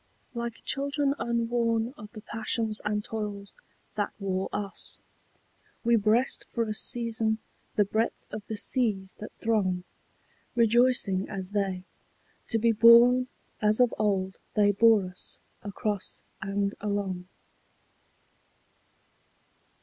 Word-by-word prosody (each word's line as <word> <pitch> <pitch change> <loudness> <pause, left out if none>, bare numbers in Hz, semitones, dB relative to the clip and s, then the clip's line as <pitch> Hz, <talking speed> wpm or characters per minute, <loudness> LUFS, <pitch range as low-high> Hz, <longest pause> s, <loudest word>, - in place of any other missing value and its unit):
Like 235 -1 -5
children 280 0 0
unworn 235 0 0
of 210 -3 -11
the 215 - -9
passions 220 0 -2
and 210 0 -1
toils 205 -2 -5 0.4
that 205 -1 -2
wore 190 -2 -2
us, 200 -2 -6 0.9
We 235 0 +4
breast 225 +4 +2
for 235 - -1
a 215 -1 -3
season 225 -1 +1 0.4
the 205 - +4
breadth 220 +3 -1
of 215 - -5
the 220 - -4
seas 205 -6 +1
that 215 - -7
throng, 190 -5 +1 0.7
Rejoicing 235 -4 +3
as 190 -1 -5
they, 195 -3 -1 0.6
to 225 - +2
be 230 +1 +3
borne 235 +3 +7 0.3
as 215 +1 +3
of 245 -2 +4
old 190 -3 0 0.2
they 205 -1 +5
bore 215 -1 +5
us 180 0 -6 0.2
Across 205 0 -3 0.2
and 200 +1 -1
along. 200 -3 -2
215 Hz, 115 wpm, -28 LUFS, 200-230 Hz, 0.9 s, borne